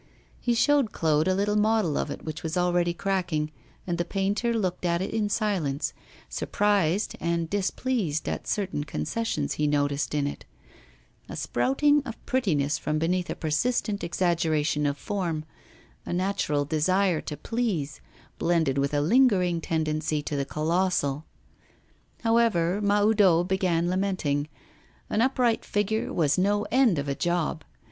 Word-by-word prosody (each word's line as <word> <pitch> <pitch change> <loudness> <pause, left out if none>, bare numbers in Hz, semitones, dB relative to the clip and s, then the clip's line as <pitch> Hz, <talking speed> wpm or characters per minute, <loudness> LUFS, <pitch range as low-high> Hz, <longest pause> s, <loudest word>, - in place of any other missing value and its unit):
He 240 -1 0
showed 280 -2 +3
Claude 155 0 +1
a 185 - +2
little 205 +2 +1
model 210 -7 +2
of - - -1
it, - - -7
which 155 -1 -5
was 160 +2 -3
already 175 -1 +2
cracking, 175 -4 -1 0.3
and 175 -2 -2
the - - +2
painter 200 +6 -1
looked 190 -7 -1
at 170 -1 +1
it 190 - -3
in 215 -2 0
silence, 190 -11 -1 0.3
surprised 205 -2 0
and 170 -1 -1
displeased 200 - -1
at - - -3
certain 190 -7 -1
concessions 225 +9 -2
he 150 - 0
noticed 145 0 0
in 145 -1 +1
it: 145 - -5 0.9
a - - -6
sprouting 290 +2 +2
of 235 -5 -6
prettiness 155 - 0
from 155 0 -1
beneath 175 +3 0
a - - -2
persistent 205 +6 -1
exaggeration 160 -4 +1
of 140 0 -1
form, 170 -4 -3 0.6
a - - -6
natural 175 -6 0
desire 175 +3 +1
to 150 - -6
please, 180 - -2 0.4
blended 160 -5 +1
with 140 +1 0
a 145 - +2
lingering 180 - +3
tendency 155 -2 -1
to 150 - -3
the 140 -1 -1
colossal. 155 -2 0 1.0
However, 210 -5 +2
Mahoudeau 205 -4 +4
began 180 -2 0
lamenting; 180 -6 -1 0.6
an 215 - +2
upright 250 -2 +2
figure 210 +2 -1
was 155 0 +1
no 205 +2 +2
end 245 - +4
of 140 0 -2
a 140 - 0
job. 170 0 -1
175 Hz, 145 wpm, -26 LUFS, 155-205 Hz, 1.0 s, Mahoudeau